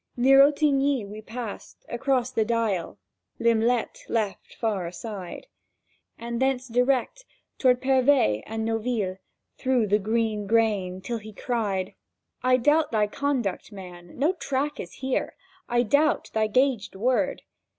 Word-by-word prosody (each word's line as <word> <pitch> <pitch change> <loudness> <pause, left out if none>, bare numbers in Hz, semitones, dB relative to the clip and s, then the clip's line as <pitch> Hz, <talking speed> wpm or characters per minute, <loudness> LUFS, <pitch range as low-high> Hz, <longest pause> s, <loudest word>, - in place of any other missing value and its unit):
Near 270 +3 +7
Ottignies 280 -4 +1
we 210 +2 -8
passed, 225 -1 -8
across 255 0 0
the 225 -4 +1
Dyle 215 -6 -1 0.4
(Lim'lette 235 +1 +1
left 215 -4 -2
far 205 -6 -1
aside), 185 - -7 0.7
And 235 +1 -4
thence 265 -1 +1
direct 250 - +1 0.4
toward 250 -1 +3
Pervez 260 - +3
and 220 0 -3
Noville 225 -4 -1 0.4
Through 255 -4 +2
green 215 0 -1
grain, 205 -5 +1
till 230 +4 -3
he 215 0 -10
cried: 200 -5 -2 0.5
"I 255 0 +4
doubt 295 +4 +3
thy 215 -2 +2
conduct, 240 -4 -2
man! 180 -3 -11
no 300 +8 +2
track 280 -2 -2
is 175 - -6
here— 260 -1 -2 0.3
I 240 0 +3
doubt 285 +6 +2
thy 220 0 +2
gagèd 240 -2 +1
word!" 255 +6 0
235 Hz, 130 wpm, -26 LUFS, 210-260 Hz, 0.7 s, Near